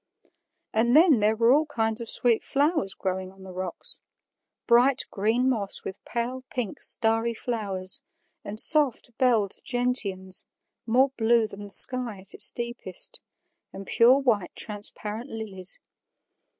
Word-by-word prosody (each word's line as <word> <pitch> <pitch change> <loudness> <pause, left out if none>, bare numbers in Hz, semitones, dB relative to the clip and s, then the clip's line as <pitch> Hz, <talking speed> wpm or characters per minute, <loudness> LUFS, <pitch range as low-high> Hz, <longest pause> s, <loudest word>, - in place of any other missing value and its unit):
And 235 +3 +2
then 310 -6 +6
there 215 +1 +2
were 230 +2 +4
all 305 +2 +2
kinds 225 -4 -1
of 230 - -6
sweet 235 -2 +2
flowers 290 - 0
growing 185 0 -4
on 190 0 -17
the 190 -1 -10
rocks 185 - -6 0.7
bright 250 +3 +3
green 225 +5 0
moss 215 -6 0
with 190 - -8
pale 245 +2 -4
pink, 245 -6 -5
starry 225 +1 +1
flowers, 200 -6 -3 0.4
and 210 +1 -2
soft 275 -6 +4
belled 230 -6 +1
gentians, 205 -7 0 0.4
more 255 +4 +3
blue 230 0 +2
than 205 -1 -10
the 205 - -9
sky 240 0 +4
at 190 - -10
its - - +4
deepest, 240 - -5 0.5
and 195 - -9
pure 240 +6 +4
white 230 -9 -1
transparent 210 +3 -4
lilies. 195 -4 -2
225 Hz, 135 wpm, -25 LUFS, 200-250 Hz, 0.7 s, then